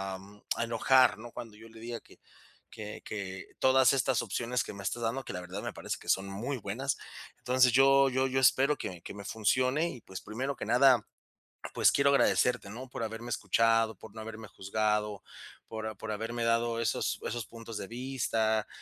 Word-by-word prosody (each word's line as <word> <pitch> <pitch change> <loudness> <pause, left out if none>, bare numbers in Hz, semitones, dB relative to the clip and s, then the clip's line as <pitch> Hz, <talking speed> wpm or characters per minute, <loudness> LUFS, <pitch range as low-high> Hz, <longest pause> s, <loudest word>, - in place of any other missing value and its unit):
a - - -7
mm 100 +2 -16
a - - -1
enojar, 120 +2 +4
¿no?, 120 +1 -10
cuando 110 -3 -8
yo 115 +1 -13
le 115 0 -14
diga 115 0 -5
que - - -20 0.5
que 105 -2 -8
que 95 -3 -6
todas 130 -1 +5
estas 135 - +2
opciones 125 +1 -1
que - - -7
me 100 -1 -8
estás 120 +4 -2
dando, 125 +4 -1
que - - -6
la 90 - -4
verdad 90 +3 -6
me - - -4
parece - - -4
que - - -15
son 95 +1 +2
muy 115 +8 -3
buenas. 120 +7 -2 0.4
Entonces, 125 -1 +4
yo 135 +1 +6
yo 130 +1 +1
yo 135 0 0
espero 135 +3 +4
que 90 -2 -6
que - - -8
me 100 0 -9
funcione 130 - +1
y, 125 - -8
pues, 95 -2 -8
primero 130 +6 -3
que - - -6
nada, 125 +2 +5 0.7
pues, - - +5
quiero 140 0 +3
agradecerte, 125 -5 +3
¿no?, 125 +5 -8
por 125 - -6
haberme 115 +2 -5
escuchado, 115 +1 +2
por 110 - -13
no 110 - -6
haberme 110 -1 -8
juzgado, 105 +1 -1 0.4
por 110 -1 -5
a 110 - -4
por - - -6
haberme 115 +2 -3
dado 115 0 +1
esos - - 0
esos 120 -2 -3
puntos 115 -1 -8
de 95 - -5
vista, 115 -3 -1
115 Hz, 200 wpm, -30 LUFS, 105-130 Hz, 0.7 s, yo